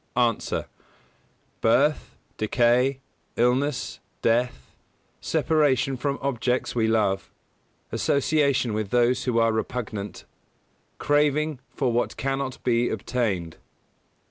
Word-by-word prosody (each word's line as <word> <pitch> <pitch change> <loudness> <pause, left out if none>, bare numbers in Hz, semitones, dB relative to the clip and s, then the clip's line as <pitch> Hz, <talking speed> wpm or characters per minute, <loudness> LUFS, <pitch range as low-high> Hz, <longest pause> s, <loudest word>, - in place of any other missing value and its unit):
_ 120 -2 +1
A. - - -6 0.9
Birth, - - +2 0.2
decay, 125 +4 +2 0.3
illness, 125 +3 0 0.2
death, 115 - 0 0.5
separation 145 -4 +1
from 140 +2 -2
objects 125 -2 -1
we 115 -2 +1
love, 100 -4 +1 0.6
association 140 -4 +1
with 105 -2 -2
those 120 +2 +2
who 125 -3 0
are 115 0 +4
repugnant, 110 -3 -4 0.7
craving 150 0 +1
for 130 -4 -1
what 120 +1 -1
cannot 135 -1 -3
be 120 -1 +2
obtained. 100 -7 -2
125 Hz, 95 wpm, -25 LUFS, 115-135 Hz, 0.9 s, are